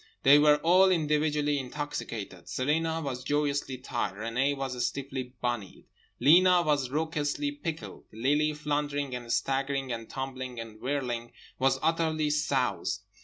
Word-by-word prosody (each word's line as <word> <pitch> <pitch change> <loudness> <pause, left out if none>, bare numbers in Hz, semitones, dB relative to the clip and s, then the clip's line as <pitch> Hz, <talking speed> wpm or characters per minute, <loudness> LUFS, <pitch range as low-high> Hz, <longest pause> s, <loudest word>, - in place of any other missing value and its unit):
They 140 +2 +8
were 150 0 +6
all 185 +3 +6
individually 150 -3 +1
intoxicated, 125 - -5
Celina 160 +4 0
was 130 -4 -4
joyously 145 -2 -1
tight. 120 -5 -3
Renée 125 +7 0
was 130 -2 -3
stiffly 130 -2 -4
bunnied. 120 -5 -3 0.3
Lena 180 +3 +6
was 145 -5 +1
raucously 155 - -1
pickled. 170 - -6
Lily, 145 +7 +1
floundering 145 -2 -2
and 120 -1 -5
staggering 135 0 0
and 115 -1 -5
tumbling 130 -2 -5
and 110 -1 -9
whirling 125 -4 -2 0.3
was 135 0 +3
utterly 160 -2 +1
soused. 140 -4 0
140 Hz, 125 wpm, -29 LUFS, 125-150 Hz, 0.3 s, They